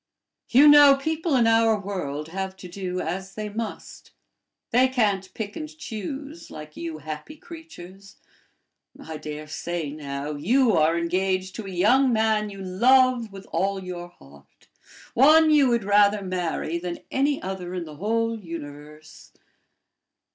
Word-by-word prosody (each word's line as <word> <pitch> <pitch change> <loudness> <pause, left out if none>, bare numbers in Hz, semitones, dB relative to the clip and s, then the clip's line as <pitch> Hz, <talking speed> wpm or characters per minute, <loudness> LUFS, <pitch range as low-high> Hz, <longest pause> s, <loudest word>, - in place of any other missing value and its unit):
You 275 +5 +7
know, 290 -1 +8
people 315 +2 -1
in 240 -3 +4
our 225 -1 +3
world 160 -7 -5
have 190 +1 -5
to 185 - -10
do 180 0 -5
as 190 +4 -5
they 215 -1 -4
must; 220 +2 -7 0.6
they 255 +2 +4
can't 205 -7 0
pick 210 -1 -5
and 310 -1 -6
choose 280 - -7
like 150 0 -10
you 165 -2 -6
happy 155 - -8
creatures. 200 - -12 0.8
I 160 -1 -7
dare 150 0 -7
say, 160 0 -4
now, 145 -1 -5
you 230 - +2
are 165 0 +3
engaged 185 +2 -1
to 220 -3 -6
a - - -6
young 245 +9 +3
man 220 -2 +1
you 195 -1 -9
love 240 +4 +3
with 195 0 -11
all 195 0 0
your 175 -1 -6
heart, 70 - -20 0.5
one 310 +5 +6
you 290 -3 +5
would 235 -2 +1
rather 205 0 +3
marry 175 -2 -2
than 175 0 -6
any 280 +1 +1
other 185 -1 -6
in 175 -2 -4
the 150 -2 -11
whole 230 +3 -1
universe." 150 -3 -10
195 Hz, 145 wpm, -24 LUFS, 170-235 Hz, 0.8 s, know